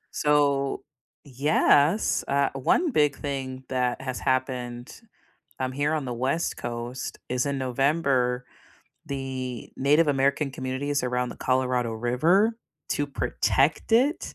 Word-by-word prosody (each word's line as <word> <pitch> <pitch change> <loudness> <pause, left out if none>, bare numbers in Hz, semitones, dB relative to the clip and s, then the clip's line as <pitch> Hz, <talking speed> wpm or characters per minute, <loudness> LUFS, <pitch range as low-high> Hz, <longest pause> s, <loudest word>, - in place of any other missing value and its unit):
So, 140 -2 +2 0.4
yes, 145 - +2
uh, 140 0 +2
one 295 - +1
big 150 - +3
thing 135 -2 -5
that 125 -1 0
has 130 -1 -4
happened, 125 -1 -2 0.7
um, 130 - -1
here 145 +3 0
on 150 -4 -1
the 125 - -3
West 135 +8 -1
Coast, 120 +2 -5
is 125 0 0
in 140 -1 -1
November, 130 -1 +1 0.6
the 130 -3 -5
Native 150 +4 +3
American 140 +1 +1
communities 135 +2 -2
around 125 0 -1
the - - -8
Colorado 125 -2 0
River 160 - +2 0.3
to 145 - 0
protect 145 +5 0
it, 270 +7 +2
135 Hz, 120 wpm, -26 LUFS, 125-145 Hz, 0.7 s, big